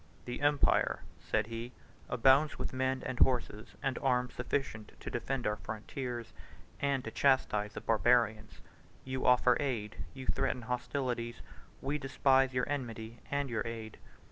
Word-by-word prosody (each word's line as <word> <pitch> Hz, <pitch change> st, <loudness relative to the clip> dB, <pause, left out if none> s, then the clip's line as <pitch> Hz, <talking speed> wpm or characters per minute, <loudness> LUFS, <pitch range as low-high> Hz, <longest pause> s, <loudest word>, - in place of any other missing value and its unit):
"The 120 Hz, +4 st, -5 dB
empire," 145 Hz, -1 st, +3 dB, 0.2 s
said 110 Hz, -1 st, 0 dB
he, 115 Hz, +2 st, -6 dB, 0.4 s
"abounds 135 Hz, +5 st, +4 dB
with -, -, -3 dB
men 130 Hz, 0 st, 0 dB
and 130 Hz, -1 st, -3 dB
horses, 120 Hz, -4 st, +1 dB
and 135 Hz, -1 st, 0 dB
arms 125 Hz, -2 st, +1 dB
sufficient 125 Hz, -4 st, -3 dB
to -, -, -6 dB
defend 125 Hz, +2 st, -2 dB
our 105 Hz, 0 st, +1 dB
frontiers, 120 Hz, +3 st, -5 dB, 0.5 s
and 140 Hz, -2 st, +1 dB
to 115 Hz, -, -5 dB
chastise 110 Hz, -7 st, +2 dB
the -, -, -6 dB
Barbarians. 110 Hz, -4 st, +2 dB, 0.4 s
You 130 Hz, 0 st, -2 dB
offer 125 Hz, 0 st, +5 dB
aid, 115 Hz, -6 st, -2 dB, 0.2 s
you 130 Hz, -1 st, -7 dB
threaten 125 Hz, -, 0 dB
hostilities: 125 Hz, -1 st, -2 dB, 0.4 s
we 145 Hz, +2 st, -1 dB
despise 135 Hz, 0 st, +3 dB
your 125 Hz, -1 st, 0 dB
enmity 115 Hz, -5 st, -4 dB
and 140 Hz, 0 st, 0 dB
your 120 Hz, -3 st, -1 dB
aid. 110 Hz, -2 st, -6 dB
125 Hz, 145 wpm, -33 LUFS, 115-135 Hz, 0.5 s, offer